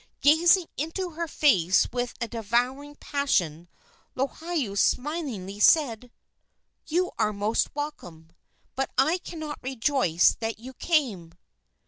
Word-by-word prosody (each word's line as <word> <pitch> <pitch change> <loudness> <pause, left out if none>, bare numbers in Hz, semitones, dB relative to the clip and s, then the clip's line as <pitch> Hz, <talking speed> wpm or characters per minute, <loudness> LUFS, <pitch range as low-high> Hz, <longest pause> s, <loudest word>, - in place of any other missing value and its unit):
Gazing 335 +5 +5
into 335 +5 -3
her 335 +1 -4
face 190 - +3
with 245 -1 -2
a 235 - -2
devouring 245 +6 -1
passion, 175 - -1 0.5
Lohiau 280 - -2
smilingly 245 - -1
said: 245 -2 +3 0.8
"You 360 +3 0
are 215 - +2
most 210 +5 -1
welcome, 175 - -7 0.4
but 270 +1 -1
I 310 +7 +3
cannot 315 -4 -7
rejoice 255 - +2
that 225 0 -3
you 250 +4 -10
came." 235 - -1
260 Hz, 110 wpm, -26 LUFS, 210-305 Hz, 0.8 s, Gazing